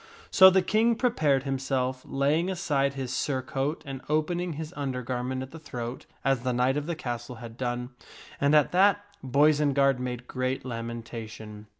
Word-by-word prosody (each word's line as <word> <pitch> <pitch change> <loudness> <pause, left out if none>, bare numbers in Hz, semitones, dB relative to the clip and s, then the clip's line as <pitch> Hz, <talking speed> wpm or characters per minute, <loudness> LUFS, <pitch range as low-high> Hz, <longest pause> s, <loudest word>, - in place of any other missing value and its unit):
So 190 -1 +9
the 190 0 +3
King 230 +2 +3
prepared 155 - +2
himself, 130 -1 -1
laying 150 +6 +1
aside 140 -7 0
his 130 -2 -4
surcoat 135 +3 -2
and 135 -2 -6
opening 170 +3 0
his 160 +2 -6
under 130 -3 -3
garment 125 +1 -3
at 130 - -10
the 165 - -9
throat, 120 -4 -6 0.2
as 135 -1 +3
the 125 +1 -1
knight 125 +2 +2
of 145 +1 -2
the 170 - -2
castle 120 -4 -5
had 115 -1 -9
done. 125 0 -3 0.5
And 145 +2 +4
at 150 -2 +4
that 200 +2 +4 0.2
Boisenard 140 -1 +3
made 125 -1 -4
great 130 +1 -2
lamentation. 115 -3 -7
135 Hz, 165 wpm, -27 LUFS, 125-150 Hz, 0.5 s, So